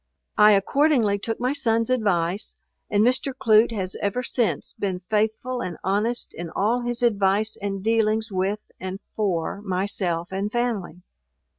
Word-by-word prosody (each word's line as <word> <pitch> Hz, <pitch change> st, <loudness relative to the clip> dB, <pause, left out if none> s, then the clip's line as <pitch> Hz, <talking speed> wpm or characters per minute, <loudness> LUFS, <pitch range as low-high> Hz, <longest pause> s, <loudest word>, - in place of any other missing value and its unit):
I 210 Hz, 0 st, +8 dB
accordingly 225 Hz, 0 st, +2 dB
took 225 Hz, +2 st, -3 dB
my 250 Hz, +3 st, 0 dB
son's 230 Hz, -4 st, +1 dB
advice, 200 Hz, -5 st, 0 dB, 0.3 s
and 205 Hz, 0 st, +3 dB
Mr. 260 Hz, +2 st, +1 dB
Clute 220 Hz, +1 st, +5 dB
has 190 Hz, -3 st, -2 dB
ever 200 Hz, +5 st, -1 dB
since 235 Hz, -6 st, -1 dB
been 185 Hz, -3 st, -3 dB
faithful 220 Hz, +4 st, 0 dB
and 175 Hz, -3 st, -4 dB
honest 210 Hz, +6 st, 0 dB
in 170 Hz, 0 st, -6 dB
all 220 Hz, +8 st, 0 dB
his 240 Hz, 0 st, -1 dB
advice 210 Hz, -1 st, +2 dB
and 195 Hz, -1 st, -3 dB
dealings 220 Hz, 0 st, +1 dB
with, 195 Hz, +3 st, -1 dB, 0.2 s
and 190 Hz, +1 st, -5 dB, 0.2 s
for, 195 Hz, -2 st, -1 dB
myself 185 Hz, -3 st, -1 dB
and 195 Hz, +2 st, -2 dB
family. 215 Hz, -8 st, -2 dB
210 Hz, 145 wpm, -24 LUFS, 190-230 Hz, 0.3 s, I